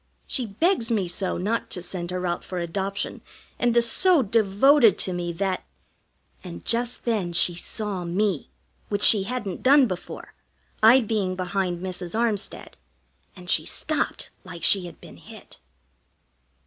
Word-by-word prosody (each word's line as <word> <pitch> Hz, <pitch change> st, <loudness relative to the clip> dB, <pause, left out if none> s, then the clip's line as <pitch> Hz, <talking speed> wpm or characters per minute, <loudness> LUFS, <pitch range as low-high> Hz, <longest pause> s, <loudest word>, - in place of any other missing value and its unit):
She 250 Hz, -4 st, -2 dB
begs 235 Hz, -, 0 dB
me 210 Hz, -6 st, 0 dB
so 185 Hz, +2 st, -2 dB
not 215 Hz, +6 st, -2 dB
to 185 Hz, -, -3 dB
send 175 Hz, -1 st, -5 dB
her 180 Hz, 0 st, -3 dB
out 175 Hz, -1 st, -2 dB
for 185 Hz, -, -7 dB
adoption, 195 Hz, +4 st, -3 dB, 0.4 s
and 240 Hz, -1 st, +1 dB
is 235 Hz, 0 st, +4 dB
so 365 Hz, -7 st, +4 dB
devoted 220 Hz, +3 st, +4 dB
to 185 Hz, -, -1 dB
me 175 Hz, -1 st, -3 dB
that 190 Hz, +1 st, -2 dB, 0.4 s
" 60 Hz, +1 st, -40 dB
And 85 Hz, 0 st, -9 dB
just 240 Hz, +1 st, -1 dB
then 205 Hz, -7 st, -1 dB
she 175 Hz, +1 st, +3 dB
saw 195 Hz, +1 st, -4 dB
me, 180 Hz, -1 st, -1 dB, 0.4 s
which 205 Hz, -1 st, 0 dB
she 200 Hz, -3 st, +7 dB
hadn't 210 Hz, -5 st, -4 dB
done 275 Hz, +1 st, +6 dB
before, 185 Hz, -6 st, -7 dB, 0.5 s
I 235 Hz, +4 st, +7 dB
being 205 Hz, -5 st, -2 dB
behind 185 Hz, -1 st, -2 dB
Mrs. 180 Hz, 0 st, -6 dB
Armstead, 220 Hz, -4 st, -3 dB, 0.6 s
and 180 Hz, -2 st, -13 dB
she 155 Hz, -, +2 dB
stopped 305 Hz, -, -2 dB
like 180 Hz, -2 st, -10 dB
she 190 Hz, -3 st, +4 dB
had 170 Hz, -, -13 dB
been -, -, -14 dB
hit. -, -, -13 dB
195 Hz, 155 wpm, -24 LUFS, 180-230 Hz, 0.6 s, she